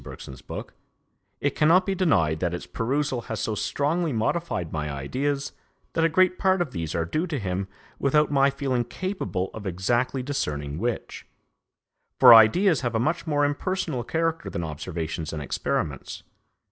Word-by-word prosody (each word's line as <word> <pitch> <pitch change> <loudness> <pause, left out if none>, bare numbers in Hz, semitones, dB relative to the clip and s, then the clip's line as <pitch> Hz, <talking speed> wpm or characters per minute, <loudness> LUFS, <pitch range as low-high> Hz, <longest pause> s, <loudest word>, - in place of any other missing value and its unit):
Bergson's 65 -1 -10
book, - - -7 0.7
it 145 - +1
cannot 170 +5 +4
be 195 - 0
denied 85 - +2
that 85 0 -1
its 85 - -7
perusal 130 +2 -1
has 110 - -3
so 110 - -1
strongly 150 - 0
modified 110 - -1
my 75 -1 -2
ideas 135 - -2 0.4
that 165 - +1
a 165 - +4
great 185 +2 +3
part 190 -1 +3
of 170 -6 -1
these 80 -5 -4
are 85 -1 0
due 155 - -1
to 150 - -2
him 95 -3 -2 0.3
without 150 +2 +3
my 140 -1 +4
feeling 135 -3 -1
capable 120 - -3
of 105 -2 -6
exactly 120 +8 0
discerning 75 - -3
which; 120 +1 -4 0.9
for 125 -2 +10
ideas 145 - +6
have 120 -3 -2
a - - +2
much 165 +7 -1
more 145 -2 +2
impersonal 150 -2 -2
character 165 +4 -1
than 85 - -4
observations 80 0 -4
and 75 -2 -4
experiments. - - -3
130 Hz, 160 wpm, -25 LUFS, -, 0.9 s, for